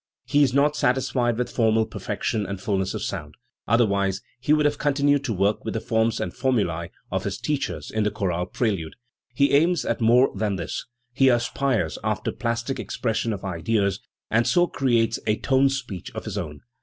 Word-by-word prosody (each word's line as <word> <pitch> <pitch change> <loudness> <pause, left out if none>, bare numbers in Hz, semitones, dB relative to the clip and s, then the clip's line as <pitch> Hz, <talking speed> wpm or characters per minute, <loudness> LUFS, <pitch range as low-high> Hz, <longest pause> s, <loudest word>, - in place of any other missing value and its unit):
He 145 - +3
is 135 -3 +4
not 145 +3 +3
satisfied 125 -3 +1
with 125 - -2
formal 110 -1 +2
perfection 110 0 -3
and 100 -1 -4
fulness 95 -1 -1
of - - -4
sound, 75 -6 -5 0.3
otherwise 100 -4 +2 0.2
he 130 +4 -1
would 150 -1 +4
have 145 0 +1
continued 145 -1 +2
to 125 - -1
work 100 +2 +1
with - - -4
the - - +1
forms 110 0 +1
and - - -3
formulae 105 -11 0 0.2
of - - -1
his - - -3
teachers 150 -2 -3
in 110 - 0
the 105 - +2
chorale 90 -3 -2
prelude. 95 -7 -2 0.4
He 140 +3 +3
aims 165 +3 +3
at 115 - -1
more 120 +4 +5
than 105 -2 0
this; 85 -3 -4 0.3
he 135 +1 +4
aspires 120 - 0
after - - -1
the - - -17
plastic 115 +3 -2
ex - - -5
pression 115 -1 0
of 100 -2 -5
ideas, 100 +2 0 0.3
and 115 +2 +3
so 175 0 +4
creates 120 -8 +1
a 105 0 +2
tone 135 0 +3
speech 125 - -5
of - - -5
his - - -5
own. 75 -1 -5
115 Hz, 195 wpm, -24 LUFS, 100-135 Hz, 0.4 s, more